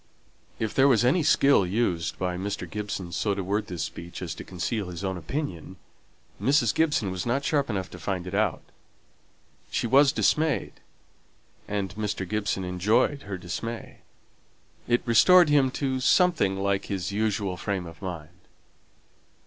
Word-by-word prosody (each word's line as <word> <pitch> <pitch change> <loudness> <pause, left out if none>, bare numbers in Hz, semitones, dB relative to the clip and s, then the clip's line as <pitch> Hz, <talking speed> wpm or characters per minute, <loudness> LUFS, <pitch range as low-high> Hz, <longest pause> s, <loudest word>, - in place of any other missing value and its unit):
If 110 -2 -2
there 135 +1 +5
was 120 -4 +4
any 140 +8 +3
skill 140 -6 +4
used 90 -4 -1
by 90 -1 -2
Mr. 95 -1 -4
Gibson 100 -2 -5
so 100 +3 0
to 100 - -3
word 100 +3 -1
this 85 -3 -4
speech 85 +2 -7
as 85 -2 -4
to - - -9
conceal 95 +2 -3
his 90 +1 -7
own 95 -1 -1
opinion, 95 - -5 0.7
Mrs. 135 -5 +3
Gibson 145 -11 +1
was 95 -1 -3
not 135 +4 -1
sharp 140 -3 +1
enough 95 -4 -2
to 90 - -10
find 90 +1 -3
it 90 - -7
out. 105 -4 0 1.1
She - - -1
was 135 +4 +5
dismayed, 150 - +1 0.9
and 100 -3 -3
Mr. 105 -2 -3
Gibson 100 -1 -1
enjoyed 105 +10 +1
her 95 - -3
dismay; 90 +7 -6 0.9
it 120 0 +2
restored 165 - +6
him 140 -3 +4
to 130 0 -2
something 145 - +3
like 100 0 0
his 95 -1 -3
usual 100 -2 -1
frame 95 0 -3
of 85 +2 -12
mind. 85 -4 -6
100 Hz, 155 wpm, -26 LUFS, 90-125 Hz, 1.1 s, restored